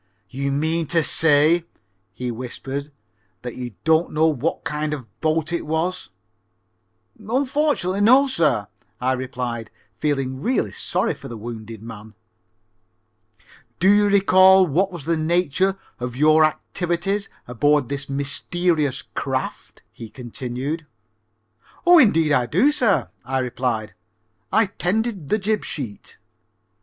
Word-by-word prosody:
"You 140 Hz, +1 st, -2 dB
mean 160 Hz, +3 st, 0 dB
to 165 Hz, 0 st, +2 dB
say," 160 Hz, +2 st, +4 dB, 0.5 s
he 125 Hz, -1 st, -4 dB
whispered, 135 Hz, +4 st, -6 dB, 0.5 s
"that 125 Hz, -1 st, -6 dB
you 120 Hz, -4 st, -7 dB
don't 160 Hz, +1 st, +2 dB
know 155 Hz, +1 st, +2 dB
what 155 Hz, 0 st, -1 dB
kind 150 Hz, -1 st, -2 dB
of 140 Hz, -, -8 dB
a -, -, -26 dB
boat 160 Hz, +1 st, 0 dB
it 170 Hz, -, -1 dB
was?" 165 Hz, +4 st, -2 dB, 1.1 s
"Unfortunately 255 Hz, -3 st, 0 dB
no, 255 Hz, +6 st, +6 dB
sir," 155 Hz, -, +1 dB, 0.3 s
I 130 Hz, +1 st, +1 dB
replied, 125 Hz, -3 st, -4 dB, 0.3 s
feeling 135 Hz, -3 st, -1 dB
really 235 Hz, -, 0 dB
sorry -, -, -1 dB
for -, -, -11 dB
the 115 Hz, -, -7 dB
wounded 110 Hz, -1 st, -8 dB
man. 110 Hz, -1 st, -10 dB, 1.6 s
"Do 185 Hz, -, +3 dB
you 205 Hz, 0 st, +4 dB
recall 190 Hz, -1 st, +6 dB
what 185 Hz, +5 st, +1 dB
was 170 Hz, -6 st, -8 dB
the 165 Hz, -, +1 dB
nature 175 Hz, +3 st, +1 dB, 0.2 s
of 125 Hz, 0 st, -5 dB
your 155 Hz, +3 st, +5 dB
activities 175 Hz, +5 st, -2 dB, 0.2 s
aboard 145 Hz, +3 st, +2 dB
this 140 Hz, +1 st, -5 dB
mysterious 145 Hz, +2 st, -1 dB
craft?" -, -, -4 dB
he 115 Hz, -, -10 dB
continued. 130 Hz, +6 st, -5 dB, 1.0 s
"Oh, 350 Hz, -1 st, +8 dB
indeed 165 Hz, -, +4 dB
I 125 Hz, -4 st, +2 dB
do, 195 Hz, -, +3 dB
sir," 240 Hz, -9 st, +1 dB
I 130 Hz, +2 st, -2 dB
replied. 125 Hz, -5 st, -2 dB, 0.6 s
"I 220 Hz, +1 st, +4 dB
tended 200 Hz, -2 st, -2 dB
the 215 Hz, -, +2 dB
jib 210 Hz, +1 st, -1 dB
sheet." 120 Hz, -9 st, -7 dB
155 Hz, 130 wpm, -22 LUFS, 130-185 Hz, 1.6 s, Oh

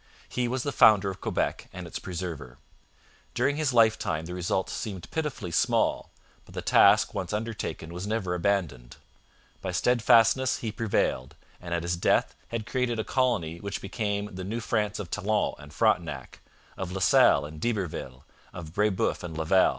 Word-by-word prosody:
He 125 Hz, -1 st, -1 dB
was 130 Hz, +1 st, -2 dB
the 145 Hz, -, -2 dB
founder 105 Hz, -6 st, +5 dB
of 95 Hz, -, -11 dB
Quebec -, -, -2 dB
and 90 Hz, -2 st, -8 dB
its 85 Hz, -, -6 dB
preserver. 85 Hz, -8 st, -6 dB, 0.8 s
During 145 Hz, +1 st, +1 dB
his 155 Hz, -2 st, +1 dB
lifetime 110 Hz, -9 st, +2 dB
the 90 Hz, -, -6 dB
results 90 Hz, +1 st, -1 dB
seemed 95 Hz, -5 st, -6 dB
pitifully 150 Hz, -, -3 dB
small, -, -, +1 dB, 0.3 s
but -, -, -16 dB
the -, -, -3 dB
task -, -, +5 dB
once -, -, -3 dB
undertaken 105 Hz, -6 st, -4 dB
was 90 Hz, +3 st, -5 dB
never 105 Hz, -5 st, -1 dB
abandoned. 85 Hz, -10 st, -1 dB, 0.7 s
By 95 Hz, -, -3 dB
steadfastness 120 Hz, +5 st, +4 dB
he 110 Hz, -, -4 dB
prevailed, 100 Hz, -, -1 dB, 0.3 s
and 85 Hz, -, -8 dB
at 85 Hz, -, -2 dB
his 85 Hz, 0 st, -1 dB
death -, -, +2 dB
had 115 Hz, -2 st, -4 dB
created 120 Hz, -1 st, -1 dB
a 110 Hz, -, -1 dB
colony 110 Hz, -, 0 dB
which 100 Hz, +1 st, -4 dB
became 105 Hz, 0 st, -3 dB
the 95 Hz, 0 st, -6 dB
New 110 Hz, +5 st, -3 dB
France 105 Hz, -2 st, -1 dB
of 95 Hz, -5 st, -6 dB
Talon 110 Hz, +2 st, 0 dB
and 75 Hz, 0 st, -12 dB
Frontenac, 85 Hz, -, 0 dB, 0.4 s
of 95 Hz, -2 st, -4 dB
La 95 Hz, -, -3 dB
Salle 90 Hz, -, +5 dB
and 75 Hz, +1 st, -9 dB
D'Iberville, 90 Hz, -, -3 dB, 0.3 s
of 80 Hz, -3 st, -8 dB
Brebeuf 105 Hz, -1 st, +1 dB
and 80 Hz, -3 st, -6 dB
Laval. 80 Hz, +4 st, +4 dB
95 Hz, 165 wpm, -27 LUFS, 85-115 Hz, 0.8 s, founder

